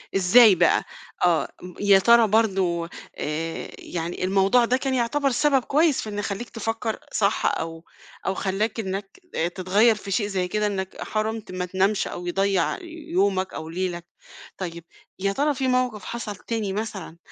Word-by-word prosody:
إزاي 195 +3 +7
بقى؟ 170 -1 +3 0.4
آه. 170 -3 +2
م 180 0 -9
يا 200 -1 +6
ترى 235 +3 +6
برضه 190 -6 +1 0.3
آآ 160 +2 -3
يعني 170 +1 -4
الموضوع 195 +6 +4
ده 250 +2 +2
كان 265 0 -2
يعتبر 265 +3 +1
سبب 270 +1 +2
كويس 300 +1 +2
في 215 - -6
إن 205 0 -4
يخلّيك 205 +3 -4
تفكّر 225 0 -3
صح 200 0 +1
أو 165 0 -6 0.4
أو 195 - +1
خلّاك 200 +4 -1
إنّك 195 - -5 0.2
آآ 165 - +1
تتغيّر 195 +6 +3
في 200 -1 -8
شيء 205 +2 +1
زي 190 -3 -1
كده 210 +3 0
إنّك 190 -2 -4
حرمت 220 0 -3
ما 185 0 -3
تنامش 190 +3 +1
أو 175 - -6
يضّيع 195 -1 +1
ي - - -13 0.3
يومك 195 - +1
أو 160 - -6
ليلك. 175 0 -3 0.5
طيب 170 -3 -6 0.4
يا 195 +1 +1
ترى 290 +6 +1
فيه 260 0 -1
موقف 250 -5 0
حصل 230 -3 -5
تاني 210 0 -3
مثلًا 200 -6 -5
200 Hz, 165 wpm, -24 LUFS, 185-225 Hz, 0.5 s, إزاي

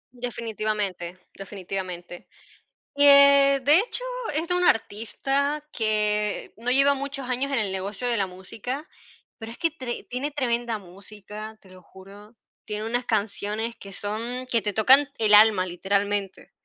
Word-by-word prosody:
Definitivamente, 215 -7 -4 0.2
definitivamente, 185 -3 -7 0.7
eh, 280 -1 +6
de 295 +4 +7
hecho, - - +1 0.3
es 315 +3 +1
de 360 - +1
un 360 - 0
artista 275 +6 0
que 210 -1 0
no 240 +3 -2
lleva 275 +2 +4
muchos 275 -1 -5
años 265 +3 -1
en 265 - +1
el 200 -3 -1
negocio 195 +5 -4
de 235 -2 +1
la 195 - +1
música, 220 - -6 0.5
pero 225 0 -9
es - - -13
que 330 - +1
tre 260 -6 -7
tiene 270 +4 -4
tremenda 235 -5 -2
música, 210 +3 -11
te 190 - -19
lo 185 0 -16
juro. 200 +5 -16 0.3
Tiene 210 0 -4
unas 245 +2 -2
canciones 220 +1 -1
que 200 -3 -12
son 230 +6 -4
que 235 -2 +1
te 205 - -2
tocan 265 +6 +5
el 210 -1 +5
alma, 210 -3 +5
literalmente, 200 +2 -2
220 Hz, 150 wpm, -24 LUFS, 200-265 Hz, 0.7 s, de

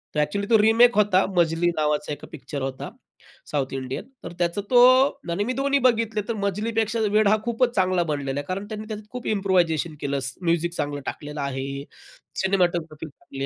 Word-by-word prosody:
तर - - +1
ऍक्च्युअली 200 +8 -2
तो 225 - +6
रिमेक 230 +2 +5
होता. 195 -2 +4
मजली 170 0 +2
नावाचा 150 -1 0
एका - - -10
पिक्चर 145 -2 -6
होता 135 0 -4 0.6
साउथ 135 -3 -1
इंडियन, 130 0 -4 0.2
तर - - -7
त्याचा 175 +3 0
तो 245 -1 +6 0.5
आणि 185 +4 0
मी 250 +4 -2
दोन्ही 280 +1 +1
बघितले, 230 -4 +2
तर 230 - -1
मजलीपेक्षा 215 +3 -1
वेड 215 0 +4
हा 215 +2 +4
खूपच 240 +1 0
चांगला 185 -2 +2
बनलेला 145 -3 -2
आहे 145 - -6
कारण 195 +2 -3
त्यांनी 215 0 -7
त्यात 215 -1 -5
खूप 250 -1 -6
इम्प्रुव्हायझेशन 180 -6 +1
केलं, 140 0 -1 0.2
म्युझिक 170 0 0
चांगलं 145 -4 -3
टाकलेलं 150 0 -5
आहे, 140 0 -4 0.6
सिनेमॅटोग्राफी 175 -5 0
चांगली 135 -2 -8
180 Hz, 175 wpm, -24 LUFS, 150-215 Hz, 0.6 s, तो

